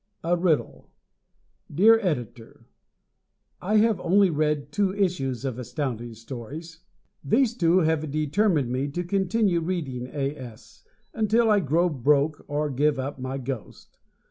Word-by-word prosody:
A 170 +2 +2
Riddle 170 -3 -1 0.8
Dear 215 +9 +5
Editor: 125 - -4 1.0
I 210 +4 +1
have 220 -1 +3
only 195 +1 +3
read 150 -1 -1
two 195 +4 +1
issues 140 - -1
of 130 -2 -3
Astounding 120 -2 -4
Stories. 135 +8 -9 0.4
These 235 +1 +2
two 175 -3 +3
have 155 -1 0
determined 155 - +1
me 130 +3 -1
to 175 +5 -3
continue 190 +1 +1
reading 150 -8 -3
A. 140 +1 -3
S. 120 -5 -12 0.3
until 225 +1 +2
I 210 - +5
grow 170 +1 +2
broke 150 0 +1
or 145 0 -1
give 145 +2 +1
up 135 +1 -4
my 130 +1 -4
ghost. 130 -6 -8
150 Hz, 135 wpm, -25 LUFS, 135-185 Hz, 1.0 s, Dear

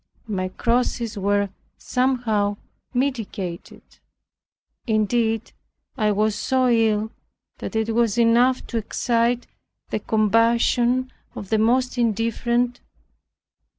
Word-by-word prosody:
My 190 -3 -2
crosses 235 +1 -1
were 200 0 +1 0.3
somewhat 235 -6 0 0.3
mitigated. 225 -9 -3 1.0
Indeed, 220 +1 +1 0.4
I 215 -5 +1
was 215 +1 +1
so 255 +3 +1
ill 220 -2 +2 0.5
that - - -6
it 220 0 0
was 230 -2 +1
enough 240 +2 +3
to 235 - -4
excite 235 +2 0 0.5
the - - 0
compassion 235 +3 +2 0.2
of 195 - -7
the 220 - +2
most 250 +3 +2
indifferent. 235 +2 0
230 Hz, 95 wpm, -23 LUFS, 215-245 Hz, 1.0 s, enough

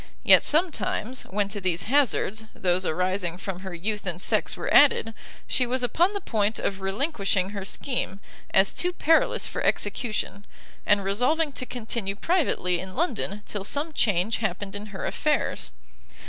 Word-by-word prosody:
Yet - - +7
sometimes, 295 - 0
when 200 +1 0
to 205 0 -5
these 180 -2 0
hazards, 225 -4 +1
those 180 0 0
arising 180 +1 -1
from 185 -1 -5
her 190 -2 -7
youth 205 +3 -3
and 175 -1 -3
sex - - 0
were - - -2
added, 265 -5 +5 0.3
she 250 - +1
was 255 +1 -1
upon 340 - +2
the - - 0
point 215 -6 0
of 195 -1 -2
relinquishing 195 - 0
her 200 -2 -5
scheme, 200 -1 -3 0.3
as 190 0 +4
too 355 0 -1
perilous 325 -2 +3
for - - -4
execution, 215 -3 -1 0.4
and 205 -1 +4
resolving 255 +11 +1
to 255 -2 -6
continue 220 -4 -3
privately 210 - +1
in 185 +1 -8
London 215 - -1
till 205 -2 -4
some 290 +9 -2
change 210 -2 +1
happened 200 -1 -3
in 205 +1 -6
her 195 -2 -6
affairs. 300 0 -1
210 Hz, 160 wpm, -26 LUFS, 190-255 Hz, 0.4 s, Yet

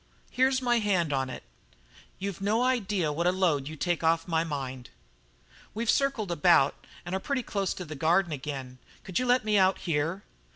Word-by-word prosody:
"Here's 260 +1 +2
my 240 -1 +3
hand 185 -8 +1
on 135 -1 -1
it. - - -7 0.7
You've 195 -1 -5
no 215 +4 +1
idea 205 -11 0
what 170 +4 0
a - - +5
load 170 -7 +1
you 155 - -6
take 175 +2 -1
off 165 +1 +2
my 165 -1 +1
mind." 130 -5 -5 0.9
"We've 230 +1 +1
circled 270 -9 0
about 165 -4 +3 0.2
and 175 - -5
are 190 - 0
pretty 265 +4 -2
close 200 -5 -2
to 180 - -6
the 155 - -7
Garden 170 +5 +2
again. 135 -3 -6 0.2
Could 185 - -2
you 255 - -1
let 245 -2 +3
me 210 -1 +3
out 190 0 +4
here?" 165 +4 -2
175 Hz, 190 wpm, -28 LUFS, 155-210 Hz, 0.9 s, a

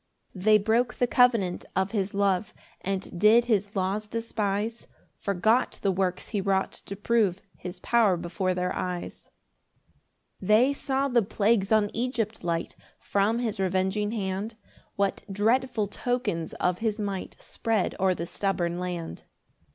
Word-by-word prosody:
2 190 - -9
They 215 +3 +6
broke 225 +4 +1
the 245 - +2
covenant 235 -7 +3
of 190 +1 +1
his 200 -2 -1
love, 200 0 +1 0.3
And 190 -2 -3
did 220 +4 +6
his 205 -3 0
laws 195 +3 -1
despise, 220 0 -2 0.3
Forgot 215 +5 +1
the 195 - +3
works 185 -1 -1
he 205 -3 -1
wrought 190 0 +1 0.2
to 200 - -4
prove 205 -3 +1
His 180 0 -8
power 220 -6 +3
before 180 +2 -2
their 180 0 -1
eyes. 180 -1 -5 1.1
3 185 - -8
They 240 +6 +5
saw 275 0 -1
the 245 -3 +3
plagues 205 0 +1
on 215 -2 +3
Egypt 230 -4 -2
light, 170 -1 -2 0.2
From 205 +3 +1
his 225 -4 -2
revenging 190 +2 0
hand: 205 0 -3 0.4
What 200 -1 0
dreadful 225 +3 +1
tokens 205 -6 -2
of 180 0 0
his 220 -1 -1
might 200 -3 -4
Spread 225 -4 -1
o'er 185 -1 +3
the 170 - -4
stubborn 175 -2 -1
land! 175 -2 -4
200 Hz, 145 wpm, -27 LUFS, 185-225 Hz, 1.1 s, They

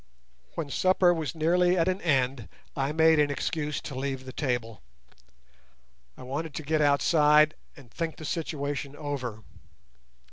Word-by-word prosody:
When 155 -4 -4
supper 185 +1 +3
was 160 -2 -4
nearly 175 +3 +2
at 165 0 +2
an 185 +1 0
end 130 -6 0 0.3
I 135 0 -1
made 160 0 +4
an 145 -1 +3
excuse 150 +1 -2
to - - -7
leave 135 0 -4
the 130 - -8
table. 120 - -3 1.4
I - - -10
wanted 140 +4 -5
to 155 - -4
get 155 +1 0
outside 150 +1 +4 0.2
and 130 -5 -15
think 165 -1 -3
the 155 - -9
situation 145 -3 -3
over. 130 -7 -5
150 Hz, 145 wpm, -27 LUFS, 135-160 Hz, 1.4 s, made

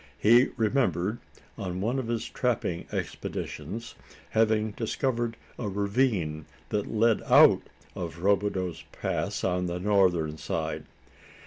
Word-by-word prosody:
He 120 +5 +6
remembered, 110 - +1 0.4
on 90 -2 -3
one 120 +7 0
of 125 - -4
his 115 -1 -2
trapping 110 -9 -1
expeditions, 115 +2 -5 0.4
having 110 -1 +2
discovered 120 +1 -1 0.2
a 110 - -2
ravine 100 - 0 0.2
that 105 -1 -1
led 115 0 +3
out - - +7 0.3
of 85 0 -6
Robideau's 100 -3 +1
Pass - - -2
on 90 -1 0
the 90 0 -3
northern 90 -6 +2
side. 80 -1 -3
105 Hz, 115 wpm, -28 LUFS, 90-115 Hz, 0.4 s, out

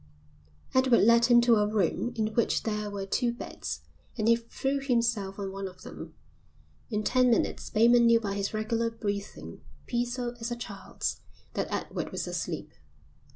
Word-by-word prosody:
Edward 260 -2 +5
led 235 +2 +6
him 240 0 +6
to 235 -1 +5
a 210 0 +3
room 210 +3 0
in 215 -1 -1
which 235 - +1
there 210 -1 -2
were 200 -1 -4
two 240 +5 +1
beds 240 - -6 0.4
and 215 -1 0
he 230 - +7
threw 270 +4 -2
himself 230 -7 0
on 195 -2 -4
one 195 0 -4
of 185 0 -12
them. - - -9 0.7
In 215 -2 -1
ten 255 +2 +3
minutes 235 - 0
Bateman 235 +2 +5
knew 230 0 +6
by 205 -3 -3
his 200 0 -2
regular 225 +2 0
breathing, 200 - -5 0.2
peaceful 245 0 -2
as 230 +1 -3
a 240 - -2
child's, 205 -5 -5 0.3
that - - -2
Edward - - -3
was - - -3
asleep. - - -4
230 Hz, 165 wpm, -29 LUFS, 205-240 Hz, 0.7 s, he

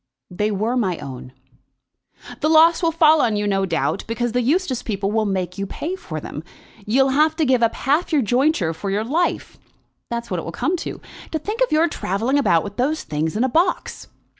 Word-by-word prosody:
"They 210 +4 -1
were 215 +4 -1
my 190 -9 0
own." 130 -3 -8 1.1
"The 310 - +1
loss 325 +2 +5
will 330 -2 +2
fall 315 -2 +5
on 225 -3 +1
you, 205 0 -1
no 195 -1 0
doubt, 155 -4 -1
because 235 +1 -2
the 250 +2 +1
Eustace 275 0 0
people 200 -2 -2
will 220 -1 +1
make 185 -1 -3
you 195 - -2
pay 335 - -4
for 155 - -6
them. 150 +1 -7 0.4
You'll 265 +5 +3
have 305 +4 +3
to 320 -1 +1
give 255 -2 +2
up 230 -1 +2
half 295 +8 0
your 295 -4 +3
jointure 245 - +1
for 195 +5 -5
your 205 +2 0
life. 320 +9 -1 0.5
That's 235 -1 -4
what 180 - -1
it - - -6
will 165 - -5
come 345 - -1
to. - - -6 0.3
To - - +1
think 420 +10 -5
of - - +2
your 315 +2 +4
travelling 240 - -1
about 170 -12 +3
with 200 -1 -8
those 295 +6 0
things 155 +5 -2
in 230 - +2
a - - +3
box!" 340 +7 0
235 Hz, 215 wpm, -21 LUFS, 195-310 Hz, 1.1 s, loss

